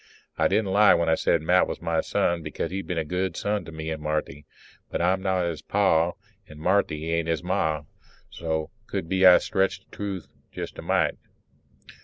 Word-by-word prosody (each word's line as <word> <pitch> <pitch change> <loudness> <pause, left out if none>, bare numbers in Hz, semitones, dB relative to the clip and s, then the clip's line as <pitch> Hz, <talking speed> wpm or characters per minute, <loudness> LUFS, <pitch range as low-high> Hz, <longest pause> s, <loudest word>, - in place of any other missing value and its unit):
I - - +3
didn't 100 -1 +1
lie 105 +1 +6
when 85 -1 +1
I - - +4
said 80 0 +1
Matt 90 +3 +4
was - - -5
my 85 -1 0
son, 85 -1 0
because 80 +2 -4
he's 95 +1 -2
been 90 - -4
a 80 - -1
good 90 +4 -2
son 105 0 -1
to - - -9
me 80 0 -5
and 80 -1 -4
Marthy. 75 -1 -3 0.4
But - - -3
I'm 90 +2 +2
not 95 -2 +1
his 85 -3 -3
Pa 85 -4 +2 0.3
and 75 - -12
Marthy 80 -3 +1
ain't 85 0 0
his 80 0 -1
Ma, 80 -5 0 0.5
so 80 -2 -3 0.2
could 80 - -3
be 95 +1 +5
I 90 - +9
stretched 95 0 -1
the - - -13
truth 100 -3 -4 0.2
jest - - -7
a - - -4
mite. - - +1
85 Hz, 200 wpm, -25 LUFS, 80-95 Hz, 0.5 s, I